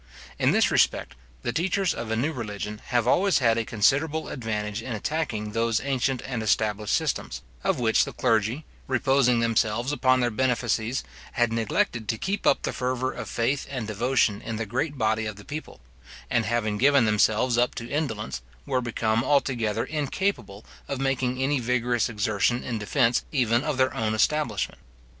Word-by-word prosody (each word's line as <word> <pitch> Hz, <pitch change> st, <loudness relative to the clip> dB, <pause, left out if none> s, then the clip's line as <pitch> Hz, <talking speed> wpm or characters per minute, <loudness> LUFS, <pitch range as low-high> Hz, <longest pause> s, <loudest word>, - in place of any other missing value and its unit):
In -, -, +3 dB
this -, -, +3 dB
respect, -, -, +2 dB, 0.3 s
the -, -, -1 dB
teachers 190 Hz, +2 st, +1 dB
of 115 Hz, -, -5 dB
a 110 Hz, -, 0 dB
new 140 Hz, +8 st, 0 dB
religion 105 Hz, -3 st, -5 dB
have 120 Hz, -1 st, +1 dB
always 195 Hz, +8 st, +4 dB
had 115 Hz, -4 st, +3 dB
a -, -, 0 dB
considerable 145 Hz, +9 st, +1 dB
advantage 105 Hz, -3 st, -3 dB
in 120 Hz, +1 st, -5 dB
attacking 110 Hz, -4 st, -2 dB
those 115 Hz, +1 st, +1 dB
ancient 135 Hz, -1 st, -1 dB
and 125 Hz, -4 st, -3 dB
established 105 Hz, -1 st, +1 dB
systems, -, -, -2 dB, 0.2 s
of -, -, +1 dB
which 115 Hz, -2 st, +3 dB
the -, -, -5 dB
clergy, 115 Hz, +6 st, 0 dB, 0.2 s
reposing 130 Hz, -2 st, +3 dB
themselves 115 Hz, +2 st, +1 dB
upon 130 Hz, -3 st, +3 dB
their 120 Hz, -1 st, +1 dB
benefices, 120 Hz, 0 st, 0 dB, 0.3 s
had 120 Hz, -3 st, +1 dB
neglected 115 Hz, -1 st, -1 dB
to 110 Hz, -, 0 dB
keep 195 Hz, -, -2 dB
up -, -, +3 dB
the -, -, -2 dB
fervour 130 Hz, 0 st, -1 dB
of -, -, -7 dB
faith 130 Hz, +4 st, -1 dB
and 130 Hz, -5 st, -4 dB
devotion 110 Hz, 0 st, +1 dB
in 115 Hz, -, -5 dB
the 115 Hz, +1 st, -3 dB
great 140 Hz, +7 st, -2 dB
body 110 Hz, -1 st, +1 dB
of 110 Hz, -, -5 dB
the 105 Hz, -, -13 dB
people; 155 Hz, +2 st, -7 dB, 0.5 s
and 115 Hz, -2 st, +2 dB
having 110 Hz, -3 st, 0 dB
given 140 Hz, -2 st, +5 dB
themselves 110 Hz, +3 st, +2 dB
up 120 Hz, +1 st, +1 dB
to 115 Hz, -, -5 dB
indolence, 110 Hz, -, -3 dB, 0.2 s
were 130 Hz, -, 0 dB
become 115 Hz, -1 st, 0 dB
altogether 120 Hz, -6 st, +1 dB
incapable 150 Hz, -, -2 dB, 0.2 s
of 140 Hz, -, -3 dB
making 130 Hz, -2 st, 0 dB
any 135 Hz, +1 st, +1 dB
vigorous 120 Hz, -1 st, 0 dB
exertion 110 Hz, +2 st, 0 dB
in 115 Hz, -3 st, -3 dB
defence 120 Hz, +3 st, +2 dB
even 120 Hz, -3 st, +2 dB
of 150 Hz, -3 st, -2 dB
their 130 Hz, 0 st, +2 dB
own 110 Hz, -1 st, -1 dB
establishment. 150 Hz, +7 st, 0 dB
120 Hz, 170 wpm, -26 LUFS, 110-135 Hz, 0.5 s, given